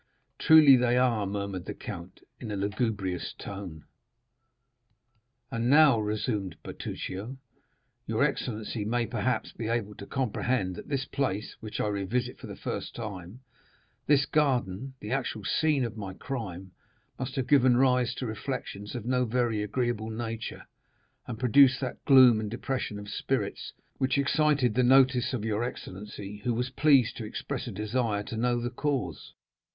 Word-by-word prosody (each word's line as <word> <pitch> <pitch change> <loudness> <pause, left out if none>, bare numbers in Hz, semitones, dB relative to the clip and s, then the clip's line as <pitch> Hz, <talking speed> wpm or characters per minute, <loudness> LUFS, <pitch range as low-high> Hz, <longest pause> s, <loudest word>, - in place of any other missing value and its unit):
"Truly 155 -4 +8
they 125 0 +2
are," 120 -5 +2
murmured 100 -2 -4
the - - -5
count 85 +2 -8 0.2
in 115 - -6
a 105 - -3
lugubrious 100 -2 -2
tone. 95 -6 -8 1.7
"And 115 0 -1
now," 145 -4 +6
resumed 105 -3 -2
Bertuccio, 110 +8 -6 0.7
"your - - +1
excellency 110 -1 -2
may, 115 +3 0
perhaps, 130 +2 -1
be 115 - -5
able 115 -3 -1
to 100 - -10
comprehend 125 -6 -1
that - - -9
this 135 -2 -1
place, 110 -7 -2
which 110 -1 -6
I - - +1
revisit 105 +5 -2
for - - -9
the - - -7
first - - -5
time—this 115 +7 -3
garden, 130 -5 0
the 105 - -6
actual 130 -5 -2
scene 150 0 +2
of 115 -1 -6
my 95 -3 -6
crime—must 110 +1 -7
have 135 -3 -1
given 130 -2 +5
rise 125 -2 +3
to 130 - -4
reflections 110 -2 -5
of 120 -3 -5
no 125 0 +1
very 120 -2 0
agreeable 110 +1 -1
nature, 115 0 -5 0.6
and 115 - -5
produced 130 +2 +5
that 130 -2 -4
gloom 130 -5 +7
and 110 -1 -3
depression 120 -1 -3
of 105 0 -8
spirits - - -2 0.3
which 130 +1 +1
excited 140 -3 +2
the 130 - +2
notice 130 0 +4
of 120 -5 -3
your 110 +1 0
excellency, 105 -3 -7
who 120 -2 0
was 125 +2 -2
pleased 135 -5 +4
to 115 - -5
express 105 - -5
a - - -4
desire 105 -1 -1
to 110 - -6
know 120 +1 +1
the 120 +1 -3
cause. 140 +1 -3
120 Hz, 150 wpm, -28 LUFS, 105-130 Hz, 1.7 s, Truly